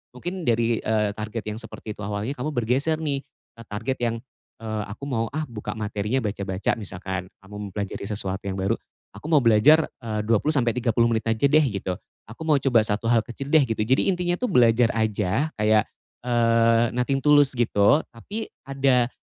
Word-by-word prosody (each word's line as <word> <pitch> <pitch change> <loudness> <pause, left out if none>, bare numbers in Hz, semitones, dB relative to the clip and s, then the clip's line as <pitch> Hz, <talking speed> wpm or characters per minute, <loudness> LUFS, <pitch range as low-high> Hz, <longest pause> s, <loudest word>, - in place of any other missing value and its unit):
Mungkin 175 +7 -5
dari, 115 -1 +2
eee, 110 -1 +1
target 110 +1 -5
yang 105 +1 -4
seperti 115 -1 -8
itu - - -9
awalnya, 105 +5 -3
kamu 150 +5 -3
bergeser 130 +7 +1
nih 140 -3 -1 0.4
ke 115 - -11
target 115 +6 -3
yang, 115 -1 0 0.4
eee, 110 -1 -3
"Aku 110 - -10
mau 115 -3 -1
ah 155 - -1
buka 105 -2 -5
materinya 105 +3 -1
baca-baca," 100 -2 -2
misalkan, 95 -1 -4 0.2
kamu 105 +1 -12
mempelajari 100 0 -5
sesuatu 95 -2 -2
yang 95 - -2
baru, 100 +4 +1 0.4
"Aku - - -9
mau 150 -4 +5
belajar, 125 +9 +6 0.2
eee, 110 -3 -3
20, 115 +8 +2
sampai 120 -3 +2
30 120 -1 +2
menit 110 -1 -1
aja 115 +4 +1
deh," 155 +2 +5
gitu, 95 -4 -3 0.3
"aku 115 - -12
mau 155 - +5
coba 125 -5 +4
1 105 +2 -2
hal 115 - +5
kecil 135 +4 -7
deh," 155 -2 +6
gitu. 115 -3 -2
Jadi, 130 +5 +2
intinya 180 -1 0
tuh 250 - -1
belajar 120 -4 +4
aja 110 +5 0
kayak, 105 0 +3 0.4
eee, 115 -1 +3
nothing 130 +2 0
to 150 - +1
lose 145 -2 +6
gitu, 120 +2 +3
tapi 205 - -6 0.2
ada 135 -3 +2
115 Hz, 185 wpm, -24 LUFS, 105-135 Hz, 0.4 s, belajar